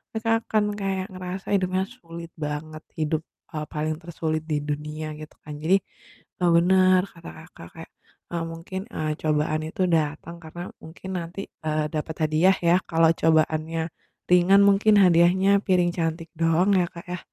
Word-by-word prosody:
mereka 225 +1 0
akan 215 -1 +1 0.2
kayak 190 -1 -1
ngerasa 185 +1 -6
hidupnya 185 -1 +1
sulit 170 -6 -10
banget. 155 +1 -5 0.2
Hidup, 155 0 0 0.3
eee, 150 -1 -3
paling 155 +1 -1
tersulit 160 -2 -3
di 150 - +2
dunia, 150 +1 -4
gitu 155 0 -11
kan. 150 - -8
Jadi, 185 +5 +5 0.6
eee, 175 - +4
bener 185 +1 +5
kata 165 -2 -11
Kakak 160 - -13
kayak, - - -11 0.4
eee, 170 -1 -2
mungkin, 180 +3 -6
eee, 155 -1 -1
cobaan 155 0 0
itu 185 - -5
datang 160 +2 -2
karena 160 +2 -8 0.2
mungkin 170 +4 -10
nanti, 170 +3 -6 0.2
eee, 155 0 0
dapat 155 +1 -3
hadiah 170 +5 +4 0.2
ya, 175 - +6
kalau 165 0 +4
cobaannya 160 +1 +1 0.4
ringan 180 +2 +6
mungkin 205 +2 +4
hadiahnya 180 +2 +4 0.2
piring 180 -2 +3
cantik 165 0 -2
doang 165 +4 +3
ya 175 - +2
Kak 170 +1 -10
ya. 180 - -3
165 Hz, 155 wpm, -25 LUFS, 155-185 Hz, 0.6 s, ya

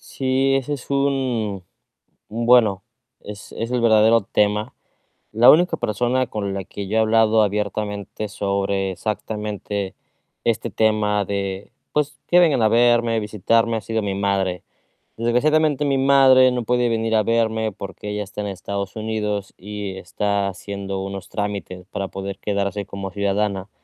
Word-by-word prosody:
Sí, 135 0 0
ese 135 +2 -2
es 135 - -10
un 130 -9 0 0.6
un 115 +2 -3
bueno, 110 -6 +4 0.4
es 105 0 -10
es 115 +1 -4
el 125 - +1
verdadero 110 0 +5
tema. 105 +2 0 0.6
La 115 +4 +7
única 170 +2 +4
persona 125 +2 0
con 100 -3 -3
la 100 - -3
que 100 +2 -7
yo 110 - -1
he - - +5
hablado 110 0 +4
abiertamente 105 0 -3
sobre 100 -1 -1
exactamente 105 -1 -4 0.5
este 115 0 0
tema 105 0 +1
de 100 0 -4 0.2
pues, 150 -1 -1
que 175 - +5
vengan 150 -8 +3
a 110 - +5
verme, 120 0 +3
visitarme, 110 +2 +1
ha - - -2
sido 110 0 -2
mi 100 -1 -2
madre. 95 -3 -1 0.6
Desgraciadamente, 145 +5 +2
mi 140 -1 +1
madre 130 -1 +6
no 125 -1 -2
puede 125 +1 +1
venir 115 0 0
a 110 - +3
verme 110 -1 +1
porque 100 0 -8
ella 105 0 -2
está 105 +1 -7
en 105 - -3
Estados 100 0 -5
Unidos 105 -2 -3
y, 100 0 -6
está 100 +2 -1
haciendo 100 0 -5
unos 95 -1 -7
trámites 100 -3 -4
para 100 -1 -3
poder 95 0 -6
quedarse 100 -1 -2
como 100 0 -6
ciudadana 100 0 -1
105 Hz, 150 wpm, -21 LUFS, 100-120 Hz, 0.6 s, La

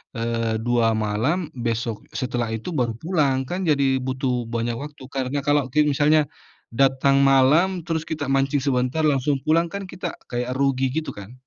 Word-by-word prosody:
eee, 115 -1 -1
2 120 -1 +3 0.2
malam, 110 - 0 0.3
besok 115 -1 -1 0.3
setelah 125 -2 -1
itu 110 +9 -6
baru 120 -2 0
pulang. 155 -6 +1
Kan, 180 - -2
jadi, 140 -2 +3 0.2
butuh 130 0 -1 0.2
banyak 115 0 -1
waktu. 145 -2 -10
Karena 135 +2 -1
kalau 145 0 +4
ki 150 - +2
misalnya, 150 +2 +4 0.5
datang 135 +1 +3
malam, 135 +7 +5 0.2
terus 160 -2 -1
kita 155 -2 -2
mancing 135 +1 +1
sebentar, 130 +3 0
langsung 145 -1 +2
pulang, 165 +2 +3
kan, 200 - -4
kita 180 -1 -5 0.2
kayak 125 +1 -2
rugi, 135 -1 +1
gitu, 160 0 -2
kan. 100 +4 -10
135 Hz, 160 wpm, -23 LUFS, 120-150 Hz, 0.5 s, malam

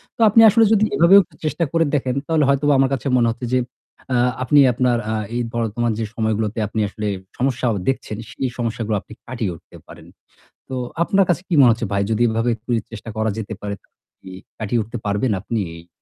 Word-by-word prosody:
তো - - -40
আপনি 225 +2 +6
আসলে 225 +2 +4
যদি 215 0 +4
এভাবেও 190 +4 +7 0.2
চেষ্টা 165 +2 0
করে 165 -1 +2
দেখেন 130 -2 -1
তাহলে 160 -2 +2
হয়তোবা 140 +1 +3
আমার 135 0 +3
কাছে 135 +1 -3
মনে 120 -1 +3
হচ্ছে 120 +2 -6
যে 130 - +4 0.6
আ - - +3 0.3
আপনি 145 +2 +4
আপনার 125 -1 +1
আ - - -1 0.2
এই 120 - 0
বর্তমান 115 0 -1
যে 110 - -1
সময়গুলোতে 110 -1 -1
আপনি 110 - -4
আসলে 105 +1 -5 0.3
সমস্যা 125 -1 0
আ - - 0 0.2
দেখছেন 110 -5 -3
সেই 130 - -3
সমস্যাগুলো 115 -2 -2
আপনি - - -14
কাটিয়ে 115 -7 -3
উঠতে - - -16
পারেন। - - -13 0.6
তো 130 - -4 0.3
আপনার 195 +1 +2
কাছে 175 0 +1
কি 175 - -3
মনে 120 -3 +7
হচ্ছে 115 -2 -4
ভাই? 100 0 +1
যদি 115 +2 +2
এভাবে 115 +2 0
একটু 115 +3 -24 0.2
চেষ্টা 115 0 -8
করা 110 0 0
যেতে 110 0 -5
পারে 100 0 -4
তাহলে - - -38 0.2
কি 95 - -11 0.3
কাটিয়ে 110 +2 -1
উঠতে 120 +3 -7
পারবেন 105 +4 0
আপনি 110 +1 -3 0.2
এই 85 +1 -15
120 Hz, 205 wpm, -20 LUFS, 110-135 Hz, 0.6 s, এভাবেও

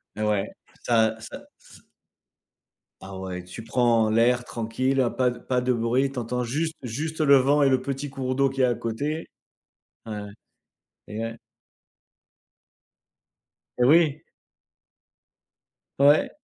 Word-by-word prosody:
Et 105 - -5
ouais, 105 -2 0 0.3
ça 110 -2 +2
ça 110 - -9 0.2
ç - - -17 1.2
Ah 95 0 -9
ouais, 90 -1 -6
tu 90 +5 -9
prends 115 -1 +2
l'air 120 +3 +3
tranquille, 125 +4 -2
heu, 120 -2 +3
pas 125 -1 +2
de 120 0 -7
pas 125 0 -1
de 125 0 +1
bruit, 125 +3 +1
tu 130 - -4
entends 125 +1 -2
juste 155 +7 -2
juste 155 +7 -4
le 140 -2 +6
vent 140 +3 +3
et 135 - +4
le 130 -1 +2
petit 140 +1 -4
cours 130 -1 -3
d'eau 135 0 +3
qu'il 135 0 -2
y - - +5
a - - +2
à 120 - 0
côté. 145 +8 -3 0.8
Ouais. 105 -2 -5 0.9
Et 105 - -6
ouais. 115 0 -4 2.4
Et 125 - +2
oui. 150 +2 +4 1.8
Ouais. 145 +2 +5
125 Hz, 140 wpm, -25 LUFS, 115-135 Hz, 2.4 s, le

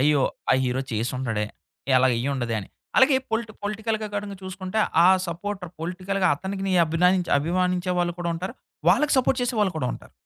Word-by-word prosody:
అయ్యో! 145 0 +4 0.3
ఆ - - +7
హీరో 125 +1 0
చేసుండడే! 115 -1 -1 0.5
ఇలాగ 130 0 +4
అయ్యిుండదే 125 -3 -1
అని. 95 - -10 0.3
అలాగే 265 0 +6
పొలిటి 225 -1 -2
పొలిటికల్‌గా 215 +1 -2
కాడంగా 205 -1 -4
చూసుకుంటే, 185 +2 -4 0.3
ఆ - - +8 0.2
సపోర్టర్ 180 +1 -5
పొలిటికల్‌గా 185 +3 -1
అతనికిని 190 +3 -3
అభినాయించి 180 +2 +2
అభిమానించే 180 +3 0
వాళ్ళు 175 0 +1
కూడా 170 -1 -2
ఉంటారు. 180 +3 -5 0.3
వాళ్ళకి 275 +12 +4
సపోర్ట్ 260 0 +2
చేసేవాాళ్ళు 215 -6 +1
కూడా 125 - -1
ఉంటారు. - - -11
185 Hz, 150 wpm, -25 LUFS, 150-205 Hz, 0.5 s, ఆ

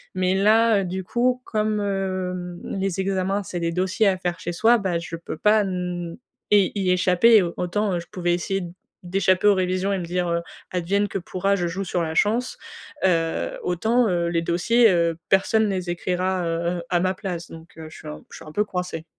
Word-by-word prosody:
Mais 185 0 +1
là, 215 +2 +4
heu, - - -1
du 185 +1 -4
coup, 245 +5 0
comme, 215 -1 -1
hem, 185 -3 -3 0.2
les 195 -1 -1
examens, 195 +1 -1
c'est 180 - -5
des 170 0 -1
dossiers 185 +4 +1
à 190 -1 +2
faire 175 -2 -3
chez 175 - -4
soi, 230 +7 +4
bah, 190 -5 -1
je 165 0 -6
peux 170 - -7
pas 210 +3 +3
mmh, 180 -2 -4 0.4
y 200 -3 +5
y 190 -3 +1
échapper 180 +5 +4
et 215 - +7
au 170 - -3
autant, 195 +2 -1
heu, - - -1
je 170 - -10
pouvais 175 -3 -1
essayer 195 +2 -1 0.4
d'échapper 185 +2 +2
aux 205 - +7
révisions 185 +1 0
et 195 - 0
me 180 - -4
dire, 175 +1 -1
heu: 170 0 0 0.3
«Advienne 190 +3 0
que 195 - -3
pourra, 195 +2 -1
je 175 -2 -1
joue 185 +4 -3
sur 175 0 -1
la 160 0 -3
chance», 225 +8 +1 0.5
heu, 165 -3 +1
autant, 220 +7 +1
heu, 170 -2 0
les 170 -1 0
dossiers, 230 +8 +3
heu, 170 -3 +1
personne 215 +3 +3
les 185 -2 -3
écrira, 180 +1 -1
heu 170 +1 -1
heu, - - -7
à 175 - +2
ma 185 +1 +1
place 180 -3 -6
donc, 165 0 -13
heu, 160 -1 -8
je - - -12
suis - - -11
un 75 0 -8
je - - -9
suis - - -12
un 155 - -10
peu 210 - +2
coincée. 180 -4 -4
185 Hz, 220 wpm, -23 LUFS, 175-200 Hz, 0.5 s, et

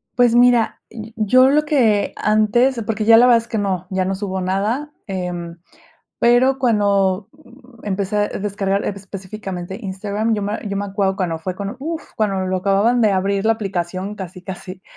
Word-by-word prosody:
Pues 245 -2 +4
mira, 240 -1 +3 0.3
yo 255 +5 +4
lo 300 +2 +3
que 230 -9 +2
antes, 230 +4 +2
porque 220 -1 -2
ya 225 +1 +8
la 245 +2 +6
verdad 240 -2 +6
es 230 0 -4
que 225 -2 -2
no, 190 -3 -2
ya 190 0 0
no 190 +1 -1
subo 190 -1 -4
nada, 210 +11 -1
eh, 185 -2 -3 0.9
pero 250 +3 +4
cuando, 200 -5 +1
mm, 255 -5 -18
empecé 200 +1 -2
a 205 0 +1
descargar 200 0 -2
específicamente 190 -1 -6
Instagram, 205 +3 -2
yo 210 - -2
me 205 +2 -2
yo 200 -1 -3
me 200 +1 -2
acuerdo 195 -1 -1
cuando 175 -4 -2
fue 180 +3 -4
cuando, 200 +5 -5
uf, 320 +4 -4
cuando 195 -3 0
lo 185 0 0
acababan 200 +6 +2
de 215 -2 +4
abrir, 195 +1 0
la 225 - +4
aplicación, 190 -2 -4
casi 185 -2 -8
casi, 185 0 -8
205 Hz, 175 wpm, -20 LUFS, 190-230 Hz, 0.9 s, ya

